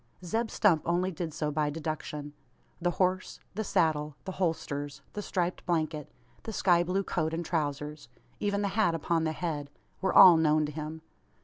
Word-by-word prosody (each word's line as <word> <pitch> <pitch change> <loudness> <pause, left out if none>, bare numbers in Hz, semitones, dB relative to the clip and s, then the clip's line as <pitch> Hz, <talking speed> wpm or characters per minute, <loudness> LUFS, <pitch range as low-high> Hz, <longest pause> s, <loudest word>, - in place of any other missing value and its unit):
Zeb 225 +5 -1
Stump 175 -8 +3
only 180 +2 +1
did 165 -1 -4
so 150 0 -2
by 150 0 0
deduction. 150 -1 -5 0.5
The 175 - +2
horse, 185 +1 0
the 220 +2 -2
saddle, 155 -7 +1
the 190 - -3
holsters, 145 -6 -2
the 210 - -3
striped 180 -3 -2
blanket, 155 -3 -1 0.3
the 225 - -6
sky 175 -4 +3
blue 185 +3 0
coat 160 -3 -1
and 170 +1 -3
trousers 150 -3 -3 0.3
even 205 0 0
the 200 - +1
hat 195 -4 +2
upon 165 +1 0
the 160 - +1
head 155 -3 -3 0.3
were 190 - +1
all 175 -3 +9
known 155 -1 +3
to 150 - -4
him. 155 +1 -6
165 Hz, 175 wpm, -29 LUFS, 150-185 Hz, 0.5 s, all